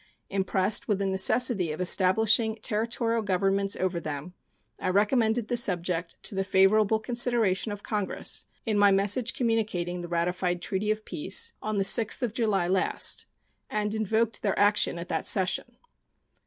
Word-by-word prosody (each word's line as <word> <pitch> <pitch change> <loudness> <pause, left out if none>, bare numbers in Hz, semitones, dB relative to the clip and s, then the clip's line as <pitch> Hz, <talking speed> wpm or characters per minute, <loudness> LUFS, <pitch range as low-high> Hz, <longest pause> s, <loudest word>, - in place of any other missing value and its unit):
Impressed 190 +1 0
with 210 - +1
the 200 - -2
necessity 190 -1 +2
of 155 - -6
establishing 215 +5 +2
Territorial 230 +1 -1
governments 195 0 0
over 185 -2 -2
them, 155 +2 -6 0.5
I - - -2
recommended 220 +3 +1
the 245 - -1
subject 180 -6 0
to - - -3
the 195 0 -1
favorable 200 +3 +3
consideration 235 -4 +1
of 205 0 -8
Congress 205 -3 -2 0.2
in 215 -3 0
my 205 0 +6
message 205 +5 +1
communicating 210 -7 -2
the 175 - -7
ratified 175 +1 -1
treaty 195 +4 -3
of 215 0 -2
peace, 460 +9 0
on 215 -1 -3
the 195 - +1
6th 225 +4 +2
of 230 -4 -2
July 215 -7 0
last, 185 +1 0 0.4
and 210 0 -2
invoked 220 +1 -1
their 200 -3 -1
action 205 -3 +3
at 170 +1 -7
that 160 - -2
session. 190 -2 0
205 Hz, 155 wpm, -27 LUFS, 185-220 Hz, 0.5 s, my